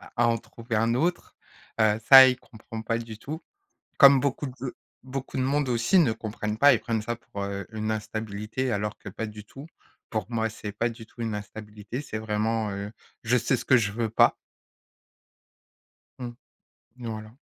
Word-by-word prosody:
à 120 Hz, -1 st, +3 dB
en 115 Hz, 0 st, +2 dB
trouver 115 Hz, +1 st, -6 dB
un 115 Hz, +2 st, +2 dB
autre. 170 Hz, +8 st, -1 dB, 0.5 s
Heu, 105 Hz, -1 st, +4 dB
ça 130 Hz, -1 st, +11 dB
il 125 Hz, -1 st, +1 dB
comprend 110 Hz, -1 st, -9 dB
pas 115 Hz, +1 st, -1 dB
du 115 Hz, -2 st, -8 dB
tout. 155 Hz, +8 st, -7 dB, 0.6 s
Comme 140 Hz, -1 st, +9 dB
beaucoup 140 Hz, +2 st, -1 dB
de 130 Hz, 0 st, -7 dB, 0.3 s
beaucoup 130 Hz, +1 st, -5 dB
de 130 Hz, -, +1 dB
monde 140 Hz, +1 st, +1 dB
aussi 120 Hz, +9 st, +3 dB
ne 150 Hz, -10 st, +4 dB
comprennent 110 Hz, -1 st, -4 dB
pas. 145 Hz, +2 st, +7 dB
Ils -, -, +1 dB
prennent 115 Hz, -2 st, -2 dB
ça 120 Hz, +2 st, -3 dB
pour, 100 Hz, -3 st, -8 dB
heu, 100 Hz, 0 st, -4 dB
une 110 Hz, 0 st, -2 dB
instabilité 110 Hz, +3 st, -3 dB
alors 105 Hz, -1 st, -2 dB
que -, -, -9 dB
pas 110 Hz, +3 st, -5 dB
du 105 Hz, -1 st, -9 dB
tout. 135 Hz, +6 st, -11 dB, 0.4 s
Pour 110 Hz, -1 st, -2 dB
moi, 115 Hz, -1 st, 0 dB
c'est 105 Hz, -1 st, -7 dB
pas 115 Hz, +3 st, -1 dB
du 115 Hz, -1 st, -11 dB
tout 120 Hz, -, -16 dB
une 110 Hz, -2 st, -2 dB
instabilité, 105 Hz, +4 st, -7 dB
c'est 110 Hz, -, -5 dB
vraiment, 110 Hz, 0 st, -1 dB
heu, 100 Hz, +1 st, -5 dB, 0.3 s
je 120 Hz, +2 st, +3 dB
sais 125 Hz, +2 st, +2 dB
ce -, -, -6 dB
que 130 Hz, -, +5 dB
je 105 Hz, -5 st, +2 dB
veux 115 Hz, 0 st, -2 dB
pas. 115 Hz, -, +5 dB, 1.8 s
Mmh. 120 Hz, -2 st, -6 dB, 0.6 s
Voilà. 110 Hz, -3 st, -6 dB
115 Hz, 185 wpm, -26 LUFS, 110-125 Hz, 1.8 s, ça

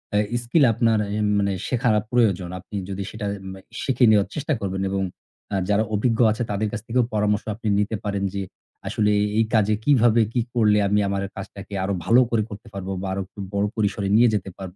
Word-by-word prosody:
আ -, -, +4 dB, 0.3 s
skill 140 Hz, +6 st, +3 dB
আপনার 115 Hz, -1 st, +2 dB, 0.2 s
এ -, -, -1 dB, 0.2 s
মানে 100 Hz, 0 st, +1 dB, 0.2 s
শেখা 125 Hz, 0 st, +1 dB, 0.2 s
প্রয়োজন। 100 Hz, -7 st, +2 dB
আপনি 90 Hz, -, -11 dB
যদি 100 Hz, 0 st, -3 dB
সেটা 110 Hz, -1 st, -6 dB, 0.3 s
মে 95 Hz, -, -9 dB, 0.2 s
শিখে 130 Hz, -2 st, +3 dB
নেওয়ার 100 Hz, -2 st, +4 dB
চেষ্টা 150 Hz, +1 st, -1 dB
করবেন 95 Hz, -1 st, -3 dB
এবং 95 Hz, 0 st, -1 dB, 0.5 s
আ -, -, +1 dB
যারা 105 Hz, +1 st, +3 dB
অভিজ্ঞ 115 Hz, +2 st, +1 dB
আছে 110 Hz, +3 st, -2 dB
তাদের 105 Hz, +1 st, 0 dB
কাছ -, -, -4 dB
থেকেও 125 Hz, +2 st, +2 dB
পরামর্শ 105 Hz, 0 st, +1 dB
আপনি 110 Hz, -1 st, -6 dB
নিতে 105 Hz, +2 st, 0 dB
পারেন 100 Hz, -2 st, -2 dB
যে 100 Hz, -, -2 dB, 0.5 s
আসলে 105 Hz, -1 st, +1 dB
এ -, -, +2 dB, 0.2 s
এই 115 Hz, -, +4 dB
কাজে 110 Hz, -1 st, +3 dB
কিভাবে 120 Hz, -4 st, +4 dB
কি 120 Hz, -, +2 dB
করলে 105 Hz, -4 st, +4 dB
আমি 105 Hz, +1 st, +2 dB
আমার 100 Hz, 0 st, -1 dB
কাজটাকে 100 Hz, +1 st, -9 dB
আরও 100 Hz, +1 st, -1 dB
ভালো 120 Hz, +5 st, +6 dB
করে 110 Hz, -2 st, +1 dB
করতে 105 Hz, +3 st, -10 dB
পারব 95 Hz, -1 st, -6 dB
বা 95 Hz, -, -4 dB
আরও 95 Hz, -, -2 dB
একটু 100 Hz, -, -17 dB
বড় 100 Hz, 0 st, +1 dB
পরিসরে 100 Hz, -2 st, 0 dB
নিয়ে 120 Hz, +2 st, +6 dB
যেতে 100 Hz, -2 st, -2 dB
পারব। 95 Hz, -2 st, -8 dB
105 Hz, 205 wpm, -23 LUFS, 100-115 Hz, 0.5 s, ভালো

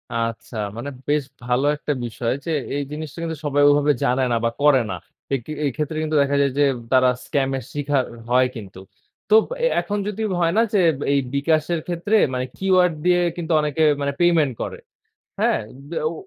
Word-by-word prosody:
আচ্ছা 115 Hz, 0 st, -3 dB, 0.2 s
মানে 140 Hz, +5 st, -5 dB, 0.2 s
বেশ 145 Hz, -1 st, +2 dB, 0.2 s
ভালো 125 Hz, +3 st, +1 dB
একটা 150 Hz, 0 st, -2 dB
বিষয় 115 Hz, 0 st, -2 dB
যে 165 Hz, -, -2 dB, 0.2 s
এই 145 Hz, -, -1 dB
জিনিসটা 155 Hz, +1 st, -6 dB
কিন্তু 160 Hz, -2 st, -3 dB
সবাই 145 Hz, 0 st, +2 dB
ওভাবে 145 Hz, 0 st, +4 dB
জানে 130 Hz, +2 st, +2 dB
না 115 Hz, -, +2 dB
বা -, -, +3 dB
করে 145 Hz, -3 st, +5 dB
না। -, -, -2 dB, 0.4 s
এই 135 Hz, -, +2 dB
কি -, -, -7 dB
এই 140 Hz, -, +1 dB
ক্ষেত্রে 155 Hz, 0 st, -3 dB
কিন্তু 155 Hz, 0 st, -2 dB
দেখা 140 Hz, 0 st, +1 dB
যায় 140 Hz, -, +2 dB
যে -, -, +5 dB, 0.3 s
তারা 130 Hz, -1 st, +5 dB, 0.2 s
স্কাম 135 Hz, -2 st, 0 dB, 0.2 s
শিখার 145 Hz, -2 st, 0 dB, 0.2 s
হয় 125 Hz, +1 st, +4 dB
কিন্তু। 100 Hz, -4 st, -9 dB, 0.5 s
তো 220 Hz, +1 st, +6 dB, 0.2 s
অ্যা -, -, +2 dB
এখন 205 Hz, -, -3 dB
যদি 210 Hz, +1 st, -4 dB, 0.2 s
হয় 165 Hz, +1 st, +2 dB
না -, -, +6 dB
যে 205 Hz, -, +4 dB, 0.3 s
এই 140 Hz, -, +3 dB, 0.2 s
বিকাশের 155 Hz, +3 st, +1 dB
ক্ষেত্রে 175 Hz, +5 st, 0 dB, 0.2 s
মানে 125 Hz, 0 st, -1 dB
কিউআর 185 Hz, -2 st, +3 dB, 0.2 s
দিয়ে 180 Hz, 0 st, +4 dB, 0.2 s
কিন্তু 170 Hz, 0 st, -4 dB
অনেকে 150 Hz, +1 st, 0 dB, 0.2 s
মানে 140 Hz, 0 st, -1 dB
পেমেন্ট 165 Hz, -6 st, +3 dB
করে। -, -, -4 dB, 0.6 s
হ্যাঁ -, -, +2 dB, 0.3 s
ব্যা 170 Hz, -, -2 dB
ও -, -, -5 dB
145 Hz, 190 wpm, -22 LUFS, 130-165 Hz, 0.6 s, তো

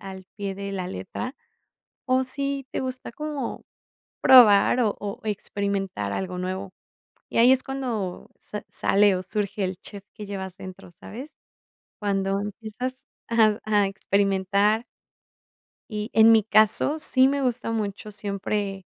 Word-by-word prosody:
al 190 Hz, -1 st, -9 dB
pie 200 Hz, -2 st, -4 dB
de 200 Hz, 0 st, -6 dB
la 185 Hz, -2 st, -4 dB
letra, 240 Hz, -, -6 dB, 0.7 s
o 260 Hz, 0 st, +2 dB
si 275 Hz, +1 st, -2 dB
te -, -, -3 dB
gusta 255 Hz, -2 st, -5 dB
como 295 Hz, -1 st, -5 dB, 0.6 s
probar 240 Hz, -2 st, +7 dB
o 220 Hz, -4 st, +1 dB
o 205 Hz, -1 st, -6 dB
experimentar 200 Hz, -, -3 dB
algo 185 Hz, -, -4 dB
nuevo. 185 Hz, +1 st, -4 dB, 0.6 s
Y -, -, -3 dB
ahí 245 Hz, +3 st, +7 dB
es 260 Hz, 0 st, +3 dB
cuando 240 Hz, -9 st, -4 dB
sa 210 Hz, -1 st, -8 dB
sale 200 Hz, 0 st, +3 dB
o 185 Hz, -, -4 dB
surge 200 Hz, +1 st, -2 dB
el 185 Hz, 0 st, -3 dB
chef 200 Hz, -2 st, -10 dB
que 210 Hz, -1 st, -8 dB
llevas 190 Hz, -2 st, -6 dB
dentro, 185 Hz, -2 st, -11 dB
¿sabes? 255 Hz, -, -11 dB, 0.6 s
Cuando 195 Hz, -1 st, -1 dB
empiezas 220 Hz, +5 st, -6 dB, 0.2 s
a 220 Hz, -2 st, +3 dB
a 210 Hz, -2 st, +2 dB
experimentar. 200 Hz, +2 st, +1 dB, 1.1 s
Y 210 Hz, +1 st, -4 dB
en 225 Hz, +1 st, +7 dB
mi 220 Hz, -2 st, +5 dB
caso, 215 Hz, +6 st, +4 dB
sí 260 Hz, -3 st, +7 dB
me 280 Hz, 0 st, 0 dB
gusta 245 Hz, -3 st, -1 dB
mucho 210 Hz, -1 st, -4 dB
siempre 200 Hz, -1 st, -3 dB
205 Hz, 140 wpm, -24 LUFS, 195-235 Hz, 1.1 s, probar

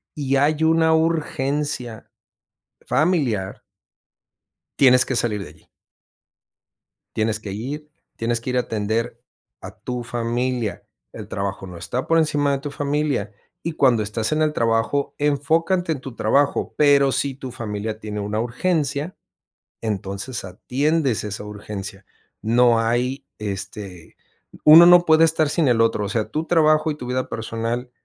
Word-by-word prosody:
y 140 Hz, -2 st, -1 dB
hay 150 Hz, +3 st, +2 dB
una 160 Hz, 0 st, +4 dB
urgencia 145 Hz, -6 st, -1 dB, 0.8 s
familiar 135 Hz, -, 0 dB, 1.2 s
tienes 125 Hz, -2 st, +6 dB
que 135 Hz, -, -2 dB
salir 105 Hz, -4 st, 0 dB
de 85 Hz, -, -10 dB
allí. 75 Hz, -, -21 dB, 1.5 s
Tienes 110 Hz, 0 st, 0 dB
que 105 Hz, -3 st, -7 dB
ir. 140 Hz, +9 st, -6 dB, 0.3 s
Tienes 115 Hz, 0 st, -1 dB
que 125 Hz, -, -3 dB
ir 125 Hz, -, 0 dB
a -, -, +3 dB
atender 110 Hz, +1 st, -2 dB, 0.4 s
a -, -, -8 dB
tu 125 Hz, -1 st, -4 dB
familia. 120 Hz, -1 st, -2 dB, 0.3 s
El -, -, -8 dB
trabajo 100 Hz, 0 st, -4 dB
no 90 Hz, -1 st, -9 dB
está 125 Hz, +9 st, -4 dB
por 165 Hz, -, +3 dB
encima 150 Hz, -3 st, +2 dB
de 140 Hz, -, 0 dB
tu 145 Hz, +1 st, -6 dB
familia. 145 Hz, -7 st, -1 dB, 0.3 s
Y 165 Hz, -, -3 dB
cuando 125 Hz, -7 st, +3 dB
estás 110 Hz, +1 st, -2 dB
en 155 Hz, 0 st, +1 dB
el 155 Hz, -1 st, +1 dB
trabajo, 115 Hz, +3 st, 0 dB
enfócate 160 Hz, +5 st, +1 dB
en 150 Hz, -, -2 dB
tu 130 Hz, -3 st, -9 dB
trabajo, 140 Hz, +2 st, +1 dB
pero 140 Hz, -2 st, +5 dB
si 135 Hz, 0 st, -1 dB
tu 130 Hz, -1 st, -8 dB
familia 110 Hz, -2 st, -5 dB
tiene 105 Hz, -1 st, -5 dB
una 105 Hz, +1 st, -2 dB
urgencia, 145 Hz, +5 st, -1 dB, 0.7 s
entonces 100 Hz, +2 st, -4 dB
atiendes 135 Hz, -, -1 dB
esa 105 Hz, -1 st, -5 dB
urgencia. 100 Hz, -1 st, -7 dB, 0.4 s
No 115 Hz, +1 st, +4 dB
hay, 125 Hz, +4 st, -1 dB
este, 100 Hz, -3 st, -7 dB, 0.5 s
uno 160 Hz, +3 st, +10 dB
no 175 Hz, 0 st, +7 dB
puede 160 Hz, 0 st, +5 dB
estar 160 Hz, -2 st, +2 dB
sin 155 Hz, 0 st, +1 dB
el 120 Hz, -2 st, +3 dB
otro, 115 Hz, -2 st, +1 dB
o -, -, -4 dB
sea, 110 Hz, 0 st, -2 dB
tu 155 Hz, +6 st, -3 dB
trabajo 155 Hz, -2 st, +3 dB
y -, -, -4 dB
tu 135 Hz, -, -8 dB
vida 130 Hz, +1 st, -2 dB
personal 115 Hz, +2 st, -4 dB
125 Hz, 150 wpm, -22 LUFS, 110-150 Hz, 1.5 s, uno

